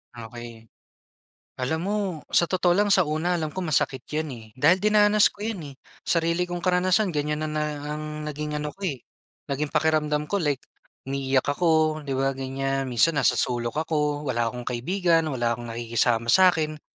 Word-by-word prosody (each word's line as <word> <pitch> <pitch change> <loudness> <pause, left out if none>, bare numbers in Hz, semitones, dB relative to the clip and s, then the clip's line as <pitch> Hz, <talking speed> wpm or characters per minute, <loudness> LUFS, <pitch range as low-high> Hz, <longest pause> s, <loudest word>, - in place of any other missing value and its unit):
Okey. 115 -1 -10 0.9
Alam 160 +6 -1
mo, 205 +2 0 0.4
sa 170 - +4
totoo 180 -1 +2
lang, 205 +3 +2
sa 185 -3 +5
una 160 +4 0
alam 155 -2 -3
kong 185 -3 -3
masakit 130 -2 +1
'yan, 155 +1 -2
eh. 115 -2 -10
Dahil 160 +8 +4
dinanas 210 0 +5
ko 205 +1 -7
'yan, 220 -5 -3
eh. - - -15 0.3
Sarili 170 +1 +1
kong 175 - -3
karanasan 185 +2 +2
ganyan 150 +1 -1
na - - -3
na 155 0 -1 0.3
ang 155 - -5 0.2
naging 150 0 -4
ano 150 0 -4
ko, 200 - -24
eh, 140 -10 -3 0.4
naging 145 +2 -2
pakiramdam 150 -1 +1
ko, 200 +2 -1
like 145 -4 0 0.5
umiiyak 135 -1 0
ako, 155 0 +2
'di 140 -2 -6
ba, 135 0 +1
ganyan? 135 0 -2
Minsan, 150 +7 +3
nasa - - +3
sulok 120 +1 -1
ako, 150 -2 -1
wala 120 -3 0
akong 125 +1 -7
kaibigan, 165 +6 +1
wala 120 -4 0
akong 120 0 -7
nakikisama 115 0 0
sa'kin. 160 -5 +3
150 Hz, 175 wpm, -25 LUFS, 130-175 Hz, 0.9 s, sa